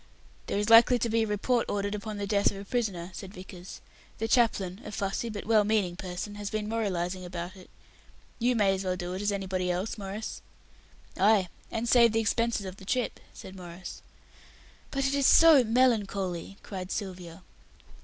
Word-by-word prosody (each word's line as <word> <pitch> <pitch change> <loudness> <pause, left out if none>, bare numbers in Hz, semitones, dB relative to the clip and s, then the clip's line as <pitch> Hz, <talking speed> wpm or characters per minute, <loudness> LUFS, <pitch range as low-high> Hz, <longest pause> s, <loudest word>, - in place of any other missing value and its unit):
"There - - -1
is 205 0 0
likely 235 +2 +8
to 235 0 -1
be 225 +1 +2
a 220 - 0
report 230 +4 0
ordered 205 0 -1
upon 210 0 -5
the 200 - -3
death 200 0 +3
of 200 - -7
a 200 - -8
prisoner," 195 -6 -2
said 195 0 -9
Vickers. 185 -1 -10 0.4
"The 225 - -2
chaplain, 215 -5 +1
a 210 - -7
fussy 200 +3 -2
but 210 -2 -6
well 215 -1 +4
meaning 205 -4 +1
person, 185 +2 -6
has 205 - -3
been 215 0 -3
memorializing 185 -5 -2
about 175 +1 -6
it. 185 -1 -15 0.7
You 245 +1 +2
may 200 -3 +3
as 190 0 -3
well 185 -1 -1
do 180 0 -5
it 185 - -4
as 205 0 +1
anybody 190 -2 -2
else, 185 +5 -2
Maurice." 200 +2 -6 0.8
"Ay. 200 -2 +4 0.2
And 225 +1 -3
save 235 -2 +5
the 225 - +2
expenses 225 -1 0
of 185 0 -7
the - - -13
trip," 250 +4 -1
said 190 - -11
Maurice. 175 -1 -9 0.9
"But 275 -1 -1
it 270 - +1
is 280 -1 +3
so 320 -5 +8
melancholy," 205 -6 0
cried 185 -2 -6
Sylvia. 180 -3 -6
200 Hz, 185 wpm, -28 LUFS, 185-225 Hz, 0.9 s, likely